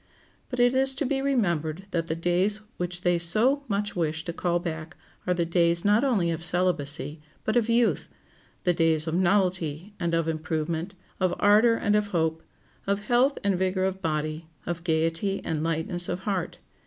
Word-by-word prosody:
But 250 - -4
it 245 +1 +4
is 265 0 +3
to 285 - -1
be 270 +1 0
remembered 185 - 0
that 165 -1 -1
the 160 - -1
days 180 +5 +1 0.2
which 180 0 -4
they 175 -1 +2
so 230 +12 +3
much 205 0 -2
wish 160 -2 -1
to 170 - -5
call 175 0 0
back 165 -1 -6 0.3
are 180 - +3
the 170 -1 0
days 170 0 +2
not 210 +4 +4
only 205 -11 +2
of 165 0 -4
celibacy, 160 -4 0 0.2
but 215 - -1
of 235 -1 +2
youth—the 230 -5 -1
days 160 -2 +2
of 160 - -3
novelty 180 -1 0
and 170 -1 0
of 165 -1 0
improvement, 160 +3 -3 0.2
of 185 -2 +1
ardor 215 +3 +5
and 210 -2 +1
of 210 -1 +1
hope, 160 -4 -1 0.5
of 200 +1 -1
health 250 +5 +3
and 195 -3 +1
vigor 185 0 0
of 190 0 -2
body, 155 0 -2 0.2
of 170 0 -4
gayety 165 +4 0
and 155 -1 -2
lightness 165 +2 -1
of 180 +1 -3
heart. 190 -4 -2
175 Hz, 180 wpm, -26 LUFS, 165-205 Hz, 0.5 s, ardor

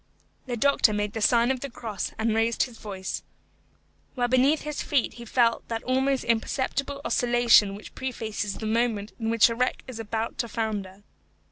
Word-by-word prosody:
The 245 -1 -2
doctor 260 -3 +4
made 210 0 -1
the 225 - -4
sign 235 +3 +4
of 260 - -2
the 280 - -5
cross 225 -5 -5
and 220 0 +1
raised 225 +1 +2
his 240 -3 -8
voice, 190 -3 -5 0.9
while 245 -2 +1
beneath 260 +5 +3
his 300 0 -4
feet 280 -5 0
he 235 - -10
felt 230 0 +2
that 225 -1 -3
almost 265 +1 +1
imperceptible 275 +4 -1
oscillation 240 -4 +4
which 210 - -11
prefaces 220 -5 -4
the 220 - -6
moment 220 -2 0
in 225 -1 -1
which 230 -1 +5
a 230 - -2
wreck 250 +2 -1
is 250 -3 -8
about 225 +1 -3
to 235 - 0
founder. 205 -4 -4
230 Hz, 175 wpm, -26 LUFS, 220-255 Hz, 0.9 s, which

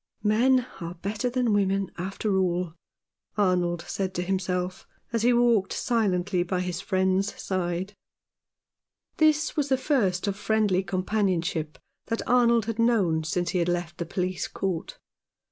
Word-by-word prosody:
" - - -38
Men 245 +4 +3
are 170 -1 -6
better 205 +7 -2
than 245 -3 +1
women, 195 -1 +1
after 195 +3 -2
all," 180 -2 0 0.6
Arnold 180 -4 +1
said 190 +1 -3
to 175 - -1
himself, 185 -1 -2 0.3
as 230 - +1
he 240 +2 +4
walked 235 -5 +3
silently 195 -6 +1
by 180 +1 -1
his 180 0 -3
friend's 190 0 0
side. 185 +1 -2 1.2
This 310 -2 +3
was 290 -2 0
the 265 - +3
first 220 - +1
of 200 -1 -1
friendly 210 -2 +1
companionship 185 -5 -1 0.3
that 230 - -3
Arnold 235 -2 +4
had 225 0 -4
known 200 -9 +2
since 175 +2 -1
he 180 -3 +1
left 175 -1 -2
the 170 - -3
police 185 +1 -2
court. 185 -4 -3
190 Hz, 145 wpm, -26 LUFS, 180-220 Hz, 1.2 s, he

